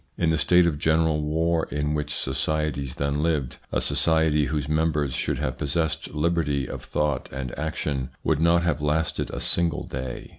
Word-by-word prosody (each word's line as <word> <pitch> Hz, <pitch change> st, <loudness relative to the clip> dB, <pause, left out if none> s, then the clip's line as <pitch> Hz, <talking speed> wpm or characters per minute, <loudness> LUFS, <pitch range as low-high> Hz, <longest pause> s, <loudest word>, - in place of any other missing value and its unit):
In 80 Hz, -2 st, +2 dB
the 80 Hz, -, +2 dB
state 90 Hz, +4 st, +5 dB
of 75 Hz, -4 st, 0 dB
general 80 Hz, 0 st, +2 dB
war 80 Hz, +2 st, +1 dB
in 75 Hz, 0 st, -1 dB
which 75 Hz, -1 st, -2 dB
societies 70 Hz, -1 st, -1 dB
then 70 Hz, +1 st, -1 dB
lived, 75 Hz, -6 st, 0 dB
a -, -, +1 dB
society 80 Hz, -2 st, +2 dB
whose 75 Hz, -1 st, -2 dB
members 75 Hz, -3 st, +1 dB
should -, -, -1 dB
have -, -, -3 dB
possessed 80 Hz, +1 st, -2 dB
liberty 75 Hz, -4 st, +1 dB
of -, -, -7 dB
thought 75 Hz, -3 st, -1 dB
and 65 Hz, -2 st, -5 dB
action 75 Hz, -3 st, -2 dB
would -, -, +1 dB
not 85 Hz, +1 st, +4 dB
have 80 Hz, -4 st, 0 dB
lasted 75 Hz, +2 st, 0 dB
a -, -, -5 dB
single 85 Hz, -3 st, +1 dB
day. 65 Hz, -1 st, -6 dB
75 Hz, 175 wpm, -25 LUFS, 70-80 Hz, -, state